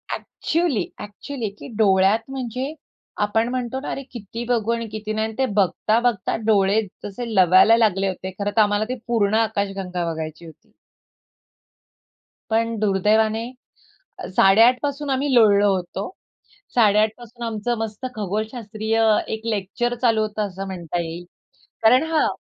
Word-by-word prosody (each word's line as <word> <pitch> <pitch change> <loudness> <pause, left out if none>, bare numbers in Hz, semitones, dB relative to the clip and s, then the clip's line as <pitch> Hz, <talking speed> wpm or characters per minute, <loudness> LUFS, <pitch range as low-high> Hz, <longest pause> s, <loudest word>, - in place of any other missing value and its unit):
Actually, 315 - -1 0.2
actually 215 +3 -6
की - - -9
डोळ्यात 195 0 +4
म्हणजे 260 +2 -4 0.5
आपण 225 +3 0
म्हणतो 255 +1 -3
ना, 285 - -5
अरे 275 - -4
किती 230 0 -7
बघू 230 -2 +1
आणि 230 -1 -3
किती 215 0 -5
नाही 220 0 0
आणि 220 - -9
ते 265 - +2
बघता, 210 +3 +2
बघता 240 -6 0
डोळे 205 0 +3 0.2
जसे 225 +3 -5
लवायला 185 +5 +6
लागले 195 -4 +2
होते. 190 0 -4
खरं 205 0 -1
तर - - +7
आम्हाला 205 0 +2
ती 255 - -1
पूर्ण 215 -3 +1
आकाशगंगा 195 -5 -1
बघायची 160 +1 -6
होती. 160 - -16 1.8
पण 230 +1 +1
दुर्दैवाने 215 +3 +1 0.8
8:30 225 +6 +6
पासून 285 0 -3
आम्ही 270 +1 0
लोळलो 205 -3 +5
होतो. 185 +2 -4 0.7
8:30 215 -2 +4
पासून 240 0 -11
आमचं 230 +1 -2
मस्त 225 +2 -5
खगोलशास्त्रीय 215 +1 -3
अ, 220 -1 +4
एक 220 0 -5
लेक्चर 230 +3 -1
चालू 225 -3 +3
होतं 215 -1 -2
असं 195 0 -7
म्हणता 175 -2 -4
येईल. 170 +1 -6 0.6
कारण 245 +5 +6
हां 315 - +3
220 Hz, 140 wpm, -22 LUFS, 200-235 Hz, 1.8 s, तर